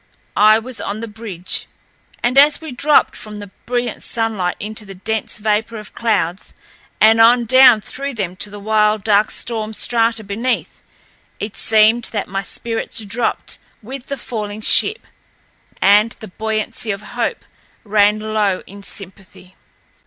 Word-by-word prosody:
I 215 +1 +6
was 245 +2 -7
on 205 +2 -4
the 230 - -5
bridge, 210 -5 -5 0.6
and 245 +2 +1
as 290 +2 +6
we 320 -3 -8
dropped 290 +4 +3
from 210 -1 -9
the 205 -2 -9 0.2
brilliant 245 -1 -2
sunlight 220 -6 -1
into 215 +1 -6
the 195 -1 -11
dense 220 +3 -3
vapor 215 +2 -1
of 210 -1 -11
clouds 200 -5 -1 0.4
and 225 +1 +6
on 235 +1 +6
down 255 -2 +7
through 275 +4 -5
them 185 -5 -3
to 205 - -3
the 205 0 -9
wild, 210 0 +2
dark 210 0 +3
storm 220 -2 -4
strata 230 -1 +1
beneath, 220 +6 -3 0.6
it 210 0 -5
seemed 220 +2 +3
that 205 -3 -3
my 195 +1 -3
spirits 225 +1 -4
dropped 225 +4 -2 0.2
with 260 +3 -8
the 280 - -4
falling 215 -3 -5
ship, 430 - +2 0.7
and 210 +3 +4
the 215 - -11
buoyancy 220 +3 -4
of 200 0 -3
hope 240 -1 -2 0.4
ran 210 -1 +3
low 215 -3 -1
in 200 +1 -12
sympathy. 190 -1 -8
215 Hz, 150 wpm, -18 LUFS, 205-230 Hz, 0.7 s, down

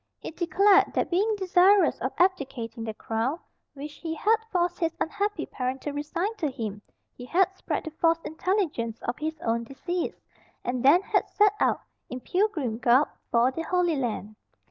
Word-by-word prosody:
He - - -7
declared 385 +4 +3
that - - 0
being 415 +5 +2
desirous 380 +1 +4
of - - -1
abdicating 260 -10 0
the 220 - -4
crown 230 +9 -2 0.4
which 290 +1 -8
he 325 -1 -4
had 440 +7 +3
forced 350 -1 0
his 330 -2 0
unhappy 405 +6 -1
parent 255 +1 -3
to 295 - -3
resign 335 +9 -3
to 305 - -1
him, 220 -6 -5 0.3
he 245 - -11
had 375 +7 +2
spread - - -3
the 315 - -6
false 330 +1 +2
intelligence 315 - -1
of 240 - -3
his 315 +1 -3
own 230 0 0
decease, 330 +8 -4 0.4
and 245 0 -2
then 315 +8 +6
had - - 0
set 415 -1 +4
out, - - +2 0.3
in 250 - -5
pilgrim 305 - -1
garb, 250 +4 +4 0.2
for 240 +2 +3
the 325 - -4
Holy 350 -1 +1
Land. 220 -5 -3
315 Hz, 170 wpm, -26 LUFS, 250-365 Hz, 0.4 s, then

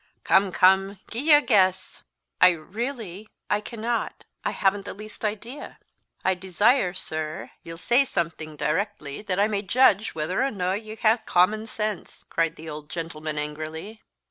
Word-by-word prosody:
"Come, 190 0 +4
come, 190 +2 +4
gi'e 275 +8 +1
a 295 0 +8
guess." 185 -5 +2 0.4
"I 180 - +9
really 210 - -6 0.2
I 205 0 +2
cannot 230 +1 -3 0.2
I - - 0
haven't 195 0 +1
the - - -6
least 215 +2 -9
idea." 220 +6 -5 0.5
"I 190 - +4
desire, 190 +2 +2
sir, 155 -3 -4
ye'll 165 0 -9
say 240 +9 +4
something 160 - -3
directly, 155 -2 -2
that 195 -3 -2
I 205 - +4
may 205 -2 -1
judge 215 0 +3
whether 160 +4 -1
or 270 - +2
no 185 -5 -1
ye 215 +2 -5
ha'e 225 +1 +3
common 215 +5 +3
sense," 215 -3 -4
cried 165 -1 +1
the 160 - -11
old 150 -1 -7
gentleman 155 -2 -5
angrily. 155 +8 -5
195 Hz, 155 wpm, -25 LUFS, 165-215 Hz, 0.5 s, I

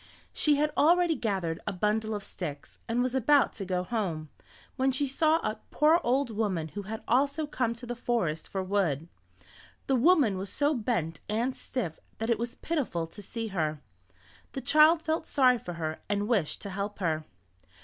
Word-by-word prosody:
She 300 -1 +3
had 300 +1 +1
already 345 +2 +4
gathered 190 - -2
a - - -1
bundle 215 +3 0
of 205 - -5
sticks, 150 -8 -7
and 240 +2 +1
was 255 0 -1
about 265 +1 +4
to 200 - -6
go 180 -1 -1
home, 180 -7 -2 0.5
when 265 0 +2
she 265 +2 0
saw 310 +4 +3
a 215 0 -2
poor 315 +3 +4
old 255 0 +1
woman 195 -7 -1
who 205 - -5
had 215 +3 -6
also 280 +5 +2
come 250 -5 -1
to 240 +2 -9
the 245 0 -4
forest 225 -10 -1
for 190 -1 -2
wood. 180 -6 0 0.8
The 270 - +2
woman 255 - +4
was 195 0 -5
so 290 +1 +1
bent 210 - -1
and 235 +5 0
stiff 195 -12 -4 0.2
that 225 +1 -1
it 230 - +1
was 235 0 -3
pitiful 265 - -2
to 165 +6 -9
see 225 +2 -5
her. 155 -5 -1 0.7
The 270 - -4
child 315 +3 +5
felt 320 0 -1
sorry 255 -3 +4
for 175 - -6
her 160 -2 -4
and 205 0 0
wished 205 -10 0
to 200 - -5
help 200 +2 -4
her. 160 -5 -1
225 Hz, 185 wpm, -29 LUFS, 185-265 Hz, 0.8 s, child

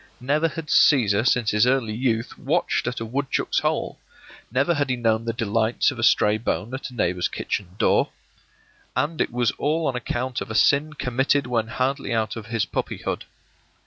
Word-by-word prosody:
Never 145 +6 +1
had 165 0 -6
Cæsar 115 -7 +4
since 120 -3 +2
his 105 +3 +3
early 125 -4 +1
youth 115 -1 -1
watched - - 0
at 125 - -2
a 115 - -4
woodchuck's 135 +4 -1
hole; - - -2 0.5
never 140 +7 +2
had 145 -3 -1
he 130 - +1
known 115 -2 0
the 115 - 0
delights 115 0 +1
of - - -9
a - - -2
stray 105 +1 +4
bone 115 +1 -2
at 130 - -5
a 125 - -13
neighbor's 90 -5 0
kitchen 95 -2 -4
door. - - +3 0.9
And 155 +2 0
it - - 0
was 120 -2 +1
all 155 +3 0
on 130 - 0
account 125 +1 -3
of - - -6
a 110 - -4
sin 145 +7 +3
committed 135 +1 0
when 115 -3 -1
hardly 130 +1 -1
out 110 -1 -1
of 110 -2 -8
his 115 -2 0
puppyhood. - - -4
120 Hz, 185 wpm, -23 LUFS, 110-135 Hz, 0.9 s, Cæsar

